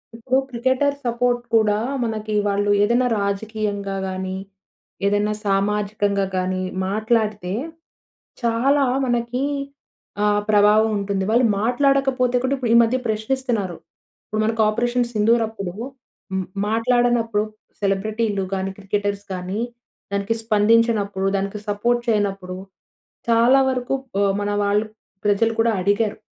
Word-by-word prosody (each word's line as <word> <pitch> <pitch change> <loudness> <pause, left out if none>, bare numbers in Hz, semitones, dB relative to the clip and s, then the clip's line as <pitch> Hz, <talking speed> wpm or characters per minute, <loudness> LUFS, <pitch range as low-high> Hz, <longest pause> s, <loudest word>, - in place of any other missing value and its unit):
ఇప్పుడు 255 +3 +1
cricketer 260 +4 +1
support 240 0 +1
కూడా 210 -2 +3 0.3
మనకి 215 -1 -3
వాళ్ళు 205 0 +1
ఏదైనా 240 +3 +3
రాజకీయంగా 200 -1 -2
గాని, 185 0 -4 0.7
ఏదైనా 205 +1 +2
సామాజికంగా 200 0 +1
గాని 185 0 -1 0.3
మాట్లాడితే 215 -2 0 0.9
చాలా 270 +5 +3 0.2
మనకి 240 +2 -1 0.8
ఆహ్, 205 0 +3
ప్రభావం 210 +1 +5
ఉంటుంది. 200 -1 -1
వాళ్ళు 240 +1 +4 0.2
మాట్లాడకపోతే 255 0 +2
కూడా 260 - +1
ఇప్పుడు 250 -3 -3
ఈ - - +6
మధ్య 235 +3 +2
ప్రశ్నిస్తున్నారు. 220 -4 -1 0.5
ఇప్పుడు 215 0 -2
మనకు 225 0 +1
'ఆపరేషన్ 240 +3 +1
సింధూర్' 225 +2 +3
అప్పుడు. 200 -5 -6 0.6
హ్మ్ 190 -1 -1 0.2
మాట్లాడనప్పుడు 230 -1 +2 0.4
సెలబ్రిటీలు 205 +1 0
గాని, 195 0 -2
క్రికెటర్స్ 205 0 -2
గాని 185 +3 -4 0.5
దానికి 200 +3 0
స్పందించినప్పుడు, 210 -2 +2
దానికి 200 +1 -2
సపోర్ట్ 235 +4 +1
చేయనప్పుడు, 195 -4 -1 0.7
చాలా 235 +4 +5
వరకు 250 0 -2 0.3
ఆహ్, 195 -1 +3
మన 205 - -1
వాళ్ళు 205 +2 +2 0.4
ప్రజలు 215 +3 +2
కూడా 230 0 +3
అడిగారు. 205 +2 +1
215 Hz, 110 wpm, -22 LUFS, 200-235 Hz, 0.9 s, ఈ